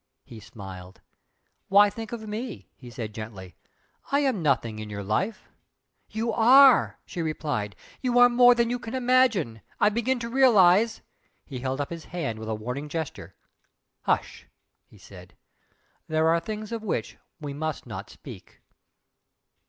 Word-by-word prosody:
He 115 Hz, -, -12 dB
smiled. 95 Hz, -4 st, -11 dB, 0.7 s
"Why 205 Hz, +1 st, +6 dB
think 225 Hz, 0 st, -8 dB
of 220 Hz, -2 st, -6 dB
me?" 220 Hz, +2 st, -6 dB
he 125 Hz, -, -13 dB
said, 115 Hz, -3 st, -6 dB
gently 105 Hz, -4 st, -9 dB, 0.6 s
"I 280 Hz, +1 st, +3 dB
am 260 Hz, -9 st, 0 dB
nothing 120 Hz, -7 st, 0 dB
in 110 Hz, -1 st, -7 dB
your 100 Hz, -1 st, -6 dB
life 180 Hz, -, -2 dB, 0.3 s
" -, -, -50 dB
"You 230 Hz, 0 st, -1 dB
are!" 260 Hz, +3 st, +6 dB
she 180 Hz, -, -5 dB
replied 145 Hz, -, -3 dB, 0.3 s
"You 245 Hz, -2 st, 0 dB
are 245 Hz, 0 st, +8 dB
more 245 Hz, 0 st, +6 dB
than 235 Hz, 0 st, +1 dB
you 245 Hz, -, -2 dB
imagine. 240 Hz, -, +1 dB, 0.2 s
I 210 Hz, -, +5 dB
begin 235 Hz, +4 st, 0 dB
to 235 Hz, -1 st, -5 dB
realise 225 Hz, -4 st, +4 dB, 0.2 s
" -, -, -43 dB
He 130 Hz, -3 st, -7 dB
held 130 Hz, +2 st, -3 dB
up 145 Hz, -, -3 dB
his 165 Hz, -2 st, -7 dB
hand 140 Hz, -11 st, -4 dB
with 110 Hz, 0 st, -7 dB
a 110 Hz, -, -1 dB
warning 125 Hz, +7 st, -5 dB
gesture. 160 Hz, -1 st, -6 dB, 0.7 s
"Hush!" -, -, -2 dB, 0.4 s
he -, -, -19 dB
said -, -, -14 dB, 0.7 s
"There 160 Hz, +1 st, +2 dB
are 165 Hz, +1 st, +3 dB
things 215 Hz, +3 st, -6 dB
of 230 Hz, -1 st, -4 dB
which 215 Hz, -, -4 dB, 0.2 s
we 145 Hz, -3 st, -6 dB
must 155 Hz, +1 st, -4 dB
not -, -, -8 dB
speak!" -, -, -13 dB
175 Hz, 160 wpm, -26 LUFS, -, 0.7 s, are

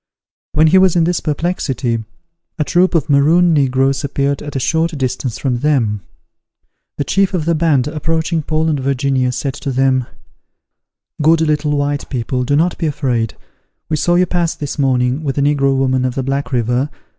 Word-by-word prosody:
When 155 Hz, +1 st, +4 dB
he 175 Hz, +4 st, +5 dB
was 185 Hz, -2 st, +3 dB
in 170 Hz, -, +3 dB
this 175 Hz, +1 st, +1 dB
perplexity, 140 Hz, -7 st, -2 dB, 0.5 s
a 150 Hz, -, +1 dB
troop 180 Hz, +3 st, +2 dB
of 160 Hz, -1 st, +1 dB
Maroon 165 Hz, +5 st, +4 dB
negroes 135 Hz, -1 st, +1 dB
appeared 140 Hz, 0 st, -1 dB
at 145 Hz, -1 st, -8 dB
a -, -, 0 dB
short 160 Hz, +3 st, 0 dB
distance 130 Hz, -2 st, -2 dB
from 125 Hz, -3 st, -1 dB
them. 120 Hz, -8 st, +1 dB, 1.0 s
The -, -, 0 dB
chief 195 Hz, +4 st, +1 dB
of 160 Hz, -4 st, -1 dB
the 170 Hz, -, +2 dB
band, 155 Hz, -5 st, +2 dB
approaching 160 Hz, +2 st, -1 dB
Paul 155 Hz, +1 st, -1 dB
and 150 Hz, -3 st, 0 dB
Virginia, 135 Hz, -1 st, 0 dB
said 135 Hz, +1 st, -3 dB
to 140 Hz, +1 st, -5 dB
them, 130 Hz, -1 st, +1 dB, 1.1 s
"Good 160 Hz, +2 st, +4 dB
little 150 Hz, -1 st, +1 dB
white 145 Hz, 0 st, -2 dB
people, 125 Hz, 0 st, -2 dB
do 145 Hz, -, +1 dB
not 170 Hz, +4 st, +1 dB
be 165 Hz, -, 0 dB
afraid. 130 Hz, -6 st, -1 dB, 0.5 s
We 155 Hz, -, +1 dB
saw 175 Hz, +3 st, +1 dB
you 180 Hz, +1 st, +4 dB
pass 175 Hz, -2 st, -1 dB
this 145 Hz, 0 st, -6 dB
morning, 130 Hz, +1 st, +1 dB
with 135 Hz, -2 st, -3 dB
a -, -, +2 dB
negro 140 Hz, -1 st, +2 dB
woman 130 Hz, -1 st, +1 dB
of 130 Hz, -1 st, -2 dB
the 135 Hz, -, -2 dB
Black 135 Hz, +2 st, -2 dB
River. 125 Hz, +3 st, 0 dB
145 Hz, 180 wpm, -16 LUFS, 130-160 Hz, 1.1 s, he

